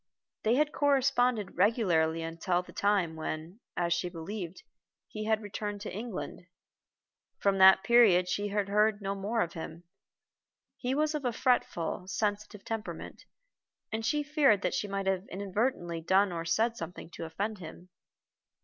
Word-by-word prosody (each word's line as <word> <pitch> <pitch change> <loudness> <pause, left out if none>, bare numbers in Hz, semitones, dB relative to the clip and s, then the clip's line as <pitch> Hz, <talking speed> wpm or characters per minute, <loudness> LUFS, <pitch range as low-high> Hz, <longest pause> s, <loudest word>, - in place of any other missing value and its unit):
They 225 +2 +2
had 300 +2 +2
corresponded 250 - +2
regularly 175 -6 +2
until 170 +2 -1
the - - -14
time 195 -5 +1
when, 160 +4 -5 0.2
as 170 -1 +2
she 170 +1 -1
believed, 175 +1 -6 0.4
he 215 0 -6
had 220 0 +1
returned 205 0 -5
to 210 - -6
England. 210 -4 -6 0.9
From 195 -1 +1
that 190 0 +8
period 215 -7 +5
she 205 +3 -1
heard 205 +1 +2
no 195 -1 -2
more 205 +4 -1
of 170 - -2
him. 160 +1 -7 0.9
He 255 +1 -2
was 305 +1 +1
of 300 -2 -3
a 245 - +1
fretful, 220 -8 0
sensitive 210 0 -2
temperament, 225 -1 -6 0.7
and 220 +1 -2
she 295 +6 +1
feared 285 - +3
that - - 0
she 205 - -1
might 195 -1 -3
have 190 0 0
inadvertently 190 -3 -2
done 190 +3 +3
or 165 -1 -4
said 225 +8 +1
something 165 0 -7
to 165 - -6
offend 205 +6 -3
him. 175 +1 -10
200 Hz, 150 wpm, -30 LUFS, 175-225 Hz, 0.9 s, that